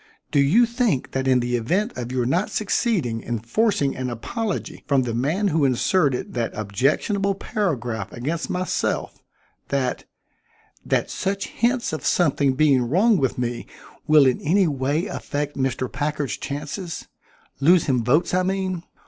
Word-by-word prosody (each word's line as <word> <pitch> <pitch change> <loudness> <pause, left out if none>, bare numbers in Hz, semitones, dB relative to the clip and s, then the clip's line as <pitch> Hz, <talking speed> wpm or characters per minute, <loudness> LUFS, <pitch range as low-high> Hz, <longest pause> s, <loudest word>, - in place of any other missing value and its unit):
"Do 145 - +3
you 170 +13 +5
think 235 - 0
that 135 0 -1
in 130 -1 +4
the 120 0 -1
event 185 - 0
of 125 0 -5
your 125 -2 0
not 175 +11 +1
succeeding 190 - 0
in 120 0 -3
forcing 140 - 0
an 130 -1 -3
apology 205 - -4
from 140 -3 +3
the 120 -2 -3
man 160 - 0
who 155 -2 +1
inserted 135 +2 +1
that 120 -2 -2
objectionable 145 - 0
paragraph 145 - -2
against 155 +7 -3
myself 180 0 -2 0.5
that 135 -2 -1 0.8
that - - 0
such 195 +1 -2
hints 240 -5 0
of 155 - -4
something 145 -5 +2
being 140 -2 +4
wrong 190 - +3
with 135 -6 0
me 120 -1 -3 0.4
will 150 -2 +6
in 130 -2 +2
any 185 +4 +3
way 145 +4 0
affect 145 -7 -4
Mr. 130 -2 -1
Packard's 145 -1 -2
chances 150 +5 -5 0.5
lose 165 +4 +5
him 125 -4 +1
votes, 150 +11 +2
I 185 - +3
mean? 185 -1 -1
145 Hz, 150 wpm, -23 LUFS, 130-190 Hz, 0.8 s, will